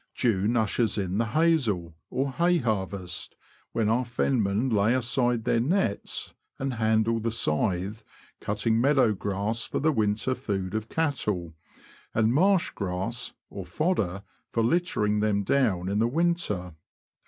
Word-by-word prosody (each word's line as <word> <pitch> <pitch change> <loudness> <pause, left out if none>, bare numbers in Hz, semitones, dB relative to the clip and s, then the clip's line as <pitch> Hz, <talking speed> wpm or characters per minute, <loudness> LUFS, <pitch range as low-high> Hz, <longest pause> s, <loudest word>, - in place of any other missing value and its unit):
June 115 -1 +1
ushers 110 0 +1
in 95 0 -1
the 115 - +2
''haysel," 115 - +1 0.2
or 135 +1 -1
hay 175 +5 +2
harvest, 100 - -3 0.4
when 110 -2 0
our 115 +4 +2
fenmen 115 -2 0
lay 105 +4 +3
aside 120 -1 +1
their 115 0 +2
nets 140 - -1 0.2
and 135 -1 -2
handle 110 0 +2
the 115 +1 -1
scythe, 100 +1 -1 0.4
cutting 110 +2 0
meadow 135 -4 +4
grass 105 +3 -2
for - - -3
the 155 +2 +3
winter 110 0 0
food 100 -8 -3
of 110 0 -3
cattle, 105 - -1 0.6
and 110 +1 +3
marsh 190 +5 +3
grass, 100 +6 -3 0.2
or 100 - -6
fodder, 100 - -1 0.3
for 115 - 0
littering 115 -8 +1
them 105 -1 +1
down 100 -7 +1
in 100 +2 0
the 115 - +3
winter. 130 - -1
110 Hz, 140 wpm, -27 LUFS, 100-130 Hz, 0.6 s, meadow